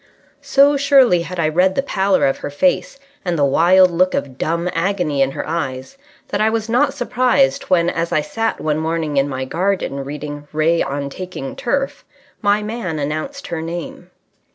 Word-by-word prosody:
So 285 Hz, +1 st, +4 dB
surely 270 Hz, -, +4 dB
had 180 Hz, +1 st, -6 dB
I 160 Hz, -, +2 dB
read 180 Hz, +4 st, +2 dB
the 275 Hz, -, +1 dB
pallor 195 Hz, -7 st, +1 dB
of 135 Hz, -, 0 dB
her -, -, -5 dB
face 270 Hz, -, 0 dB, 0.3 s
and 175 Hz, -2 st, -1 dB
the 145 Hz, -, +3 dB
wild 180 Hz, +6 st, +5 dB
look 185 Hz, +2 st, +2 dB
of 130 Hz, -2 st, -4 dB
dumb 170 Hz, +2 st, -1 dB
agony 170 Hz, -5 st, 0 dB
in 135 Hz, -, +3 dB
her -, -, -5 dB
eyes 135 Hz, -, -4 dB, 0.3 s
that -, -, -1 dB
I 215 Hz, -, +4 dB
was 220 Hz, 0 st, -2 dB
not 270 Hz, +5 st, +2 dB
surprised 245 Hz, -, +1 dB
when, 175 Hz, -2 st, +3 dB
as 170 Hz, -1 st, -1 dB
I 155 Hz, -, +2 dB
sat 225 Hz, +9 st, -2 dB
one 155 Hz, 0 st, -1 dB
morning 160 Hz, -2 st, -2 dB
in 140 Hz, +1 st, +2 dB
my 130 Hz, -1 st, -3 dB
garden 175 Hz, -3 st, -1 dB
reading 145 Hz, +1 st, -7 dB
Ray 160 Hz, +2 st, +2 dB
on 140 Hz, 0 st, -3 dB
Taking 185 Hz, -, -7 dB
Turf, 270 Hz, +1 st, -2 dB, 0.4 s
my 205 Hz, 0 st, +2 dB
man 210 Hz, -7 st, -4 dB
announced 155 Hz, -, -4 dB
her 165 Hz, -2 st, -3 dB
name. 170 Hz, +1 st, -6 dB
170 Hz, 180 wpm, -19 LUFS, 150-215 Hz, 0.4 s, wild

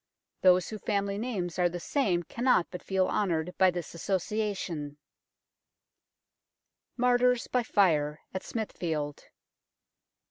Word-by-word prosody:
Those 185 Hz, -1 st, +5 dB
whose 215 Hz, -2 st, -7 dB
family 200 Hz, -1 st, -1 dB
names 190 Hz, -8 st, -3 dB
are 175 Hz, -1 st, +4 dB
the 175 Hz, +1 st, -5 dB
same 185 Hz, -, 0 dB
cannot 235 Hz, -3 st, +2 dB
but 180 Hz, -, -6 dB
feel 190 Hz, -1 st, +1 dB
honoured 180 Hz, -3 st, -1 dB
by 190 Hz, -, +6 dB
this 175 Hz, -1 st, -5 dB
association. 185 Hz, -5 st, -2 dB, 2.0 s
MARTYRS 250 Hz, 0 st, +3 dB
BY 250 Hz, -, +1 dB
FIRE 155 Hz, -9 st, +2 dB
AT 190 Hz, -, -3 dB
SMITHFIELD. 160 Hz, -9 st, -4 dB
185 Hz, 110 wpm, -29 LUFS, 175-215 Hz, 2.0 s, by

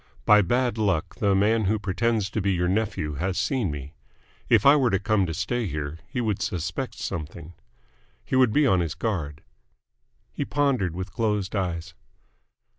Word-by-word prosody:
By 105 Hz, 0 st, +7 dB
bad 120 Hz, +4 st, 0 dB
luck 95 Hz, -7 st, 0 dB
the 100 Hz, -2 st, +2 dB
man 105 Hz, +2 st, +2 dB
who 110 Hz, +3 st, +2 dB
pretends 105 Hz, +1 st, -1 dB
to 110 Hz, -, -1 dB
be 100 Hz, +1 st, +1 dB
your 90 Hz, 0 st, 0 dB
nephew 95 Hz, -6 st, -1 dB
has 95 Hz, +1 st, -1 dB
seen 125 Hz, -9 st, 0 dB
me. 70 Hz, -1 st, -6 dB, 0.6 s
If 110 Hz, -3 st, +4 dB
I 140 Hz, +1 st, +8 dB
were 135 Hz, -5 st, +3 dB
to 100 Hz, -, +2 dB
come 100 Hz, -1 st, +1 dB
to 80 Hz, -, -3 dB
stay 120 Hz, +6 st, -1 dB
here, 75 Hz, -1 st, -4 dB
he 130 Hz, -, -4 dB
would 110 Hz, -5 st, -1 dB
suspect 85 Hz, -3 st, -3 dB
something. 80 Hz, +1 st, -6 dB, 0.7 s
He -, -, -2 dB
would 130 Hz, -3 st, +5 dB
be 150 Hz, +5 st, +3 dB
on 95 Hz, -8 st, +3 dB
his 85 Hz, -3 st, -2 dB
guard." 80 Hz, -10 st, -3 dB, 0.9 s
He -, -, -3 dB
pondered 130 Hz, -, 0 dB
with 95 Hz, +1 st, -6 dB
closed 105 Hz, -2 st, -1 dB
eyes. 85 Hz, -3 st, -3 dB
100 Hz, 175 wpm, -25 LUFS, 85-115 Hz, 0.9 s, I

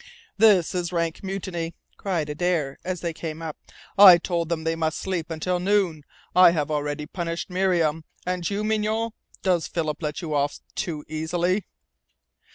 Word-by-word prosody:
"This 200 Hz, -5 st, +5 dB
is 175 Hz, -1 st, -2 dB
rank 170 Hz, -2 st, -1 dB
mutiny!" 185 Hz, -4 st, -4 dB, 0.2 s
cried 175 Hz, -6 st, -2 dB
Adare, 150 Hz, -2 st, -1 dB
as 185 Hz, -1 st, -3 dB
they 170 Hz, -2 st, -2 dB
came 160 Hz, -1 st, -6 dB
up. 160 Hz, -2 st, -4 dB, 0.4 s
"I 190 Hz, -4 st, +11 dB
told 170 Hz, -1 st, -2 dB
them 165 Hz, -2 st, -1 dB
they 165 Hz, 0 st, 0 dB
must 160 Hz, -1 st, -1 dB
sleep 180 Hz, -4 st, -3 dB
until 175 Hz, +3 st, -1 dB
noon. 185 Hz, -4 st, +1 dB, 0.3 s
I 180 Hz, -1 st, +9 dB
have 150 Hz, -2 st, -1 dB
already 150 Hz, 0 st, -2 dB
punished 170 Hz, +2 st, -4 dB
Miriam. 175 Hz, -4 st, +1 dB, 0.2 s
And 180 Hz, -1 st, -1 dB
you, 205 Hz, +1 st, -2 dB
Mignonne? 220 Hz, +1 st, 0 dB, 0.3 s
Does 180 Hz, -4 st, +2 dB
Philip 155 Hz, -2 st, -2 dB
let 150 Hz, -2 st, -3 dB
you 155 Hz, -2 st, -3 dB
off 145 Hz, 0 st, 0 dB
too 165 Hz, -7 st, -4 dB
easily?" 175 Hz, +5 st, -1 dB
170 Hz, 160 wpm, -25 LUFS, 160-185 Hz, 0.4 s, I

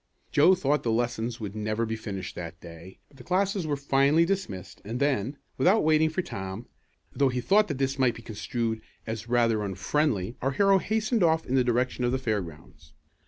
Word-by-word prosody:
Joe 165 Hz, +6 st, +6 dB
thought 150 Hz, -4 st, 0 dB
lessons 120 Hz, 0 st, -1 dB
would 105 Hz, -2 st, -6 dB
never 110 Hz, +2 st, -1 dB
be 110 Hz, 0 st, -3 dB
finished 100 Hz, -4 st, -6 dB
that 85 Hz, -1 st, -7 dB
day, 85 Hz, +2 st, -12 dB
but 140 Hz, -, -21 dB
the 125 Hz, -, -12 dB
classes 190 Hz, 0 st, 0 dB
were 145 Hz, -, 0 dB
finally 140 Hz, +4 st, +3 dB
dismissed 180 Hz, -, -4 dB
and 115 Hz, +4 st, -4 dB
then, 140 Hz, -2 st, 0 dB, 0.2 s
without 185 Hz, +10 st, +4 dB
waiting 155 Hz, 0 st, +4 dB
for 180 Hz, +4 st, -2 dB
Tom, 95 Hz, -, -6 dB, 0.5 s
though 140 Hz, -1 st, +2 dB
he 125 Hz, 0 st, -2 dB
thought 205 Hz, -, +3 dB
this 135 Hz, -2 st, -2 dB
might 125 Hz, -3 st, +3 dB
be 115 Hz, -, -11 dB
construed 110 Hz, +1 st, -3 dB, 0.2 s
as 110 Hz, +1 st, -5 dB
rather 115 Hz, -3 st, +2 dB
unfriendly, 100 Hz, +2 st, -1 dB
our 135 Hz, +2 st, 0 dB
hero 195 Hz, +4 st, +4 dB
hastened 220 Hz, +3 st, 0 dB
off 160 Hz, -2 st, +3 dB
in 125 Hz, -, -4 dB
the 130 Hz, -1 st, +4 dB
direction 125 Hz, +1 st, 0 dB
of 120 Hz, -, +2 dB
the 130 Hz, -, +1 dB
fairgrounds. 85 Hz, -, -5 dB
125 Hz, 185 wpm, -27 LUFS, 110-155 Hz, 0.5 s, Joe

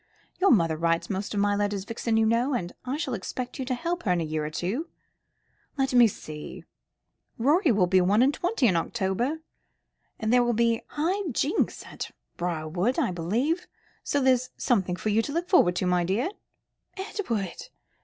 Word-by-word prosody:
Your 390 Hz, +1 st, +4 dB
mother 165 Hz, -8 st, +3 dB
writes 165 Hz, +4 st, 0 dB
most 200 Hz, +2 st, -3 dB
of -, -, +1 dB
my 205 Hz, 0 st, +2 dB
letters, 205 Hz, -1 st, -1 dB
Vixen, 230 Hz, 0 st, -1 dB
you 225 Hz, -, +4 dB
know, 235 Hz, +5 st, +2 dB
and 175 Hz, -6 st, -3 dB
I 260 Hz, +3 st, -2 dB
shall 275 Hz, -5 st, -2 dB
expect 245 Hz, +6 st, -5 dB
you 260 Hz, -, -2 dB
to 255 Hz, 0 st, -1 dB
help 340 Hz, +6 st, -2 dB
her 190 Hz, -, 0 dB
in 175 Hz, -, +2 dB
a -, -, -1 dB
year 155 Hz, -1 st, -2 dB
or 150 Hz, -, -3 dB
two. 200 Hz, -, -3 dB, 0.9 s
Let 270 Hz, -1 st, 0 dB
me 240 Hz, -2 st, +7 dB
see; 155 Hz, -7 st, -8 dB, 0.7 s
Rorie 295 Hz, -, +3 dB
will 200 Hz, -4 st, +3 dB
be 185 Hz, +1 st, +4 dB
one 205 Hz, +6 st, +4 dB
and 275 Hz, +3 st, +3 dB
twenty 355 Hz, -, 0 dB
in 190 Hz, -7 st, +4 dB
October, 235 Hz, -, -1 dB, 0.8 s
and 220 Hz, +1 st, 0 dB
there 250 Hz, -1 st, +5 dB
are -, -, -1 dB
to 240 Hz, -, +2 dB
be 230 Hz, 0 st, +2 dB
high 355 Hz, +5 st, -1 dB
jinks 290 Hz, -, 0 dB
at -, -, -6 dB, 0.3 s
Briarwood, 175 Hz, +6 st, -1 dB
I 275 Hz, -, +1 dB
believe, 230 Hz, -, -1 dB, 0.4 s
so 285 Hz, -, 0 dB
there's 255 Hz, -2 st, +2 dB
something 190 Hz, -7 st, +1 dB
for 215 Hz, -, -3 dB
you 215 Hz, +2 st, +3 dB
to 280 Hz, -, -5 dB
look 340 Hz, +2 st, -1 dB
forward 270 Hz, -, +4 dB
to, 185 Hz, -, 0 dB
my 180 Hz, -1 st, +2 dB
dear." 200 Hz, -, 0 dB, 0.7 s
"Edward!" 240 Hz, -, -3 dB
225 Hz, 190 wpm, -27 LUFS, 185-270 Hz, 0.9 s, me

